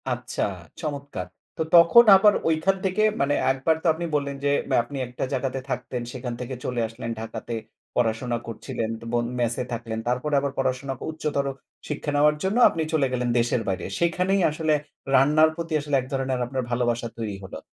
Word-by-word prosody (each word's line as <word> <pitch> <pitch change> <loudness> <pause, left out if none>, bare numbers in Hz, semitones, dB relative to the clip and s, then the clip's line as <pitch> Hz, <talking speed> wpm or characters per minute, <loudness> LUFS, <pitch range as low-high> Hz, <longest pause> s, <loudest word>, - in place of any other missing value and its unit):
আচ্ছা, - - -2 0.4
চমৎকার। 140 - -4 0.3
তো - - -2
তখন 170 +8 +8
আবার 205 +2 +6 0.2
ঐখান 165 +4 +2
থেকে 190 +3 +1 0.2
মানে 140 +1 +2 0.2
এক 135 - -2
বার 160 - +4
তো - - +1
আপনি 170 +2 -4
বললেন 140 -1 -1
যে, - - +3 0.3
আপনি 140 +4 -8
একটা 125 - -5
জায়গাতে 135 0 -1
থাকতেন, 125 -2 -3
সেখান 125 -1 -4
থেকে 130 +1 -5
চলে 125 -2 -1
আসলেন 115 +1 -6
ঢাকাতে 115 +1 -6 0.4
পড়াশোনা 120 +1 0
করছিলেন, 115 0 -4
তো 115 - -11
বোন 120 0 +1
ম্যাসে 120 +1 0
থাকলেন, 115 -1 -4
তারপরে 125 +5 0
আবার 140 0 -2
পড়াশোনা, 135 +1 -1 0.2
উচ্চতর 150 -3 -2 0.4
শিক্ষা 150 0 -3
নেওয়ার 150 +1 +4
জন্য 195 +4 0
আপনি 165 - -3
চলে 145 -4 +3
গেলেন 125 -1 0
দেশের 120 0 +1
বাইরে। 95 -1 -2
সেখানেই 180 +3 +2
আসলে 155 0 0 0.4
রান্নার 150 +4 +5
প্রতি 165 -1 -5
আসলে 145 -1 -1
এক - - -9
ধরনের 135 -1 -1
আপনার 130 +1 -3
ভালোবাসা 120 -1 0
তৈরি 110 -3 -3
হলো। 95 - -7
135 Hz, 175 wpm, -25 LUFS, 120-155 Hz, 0.4 s, তখন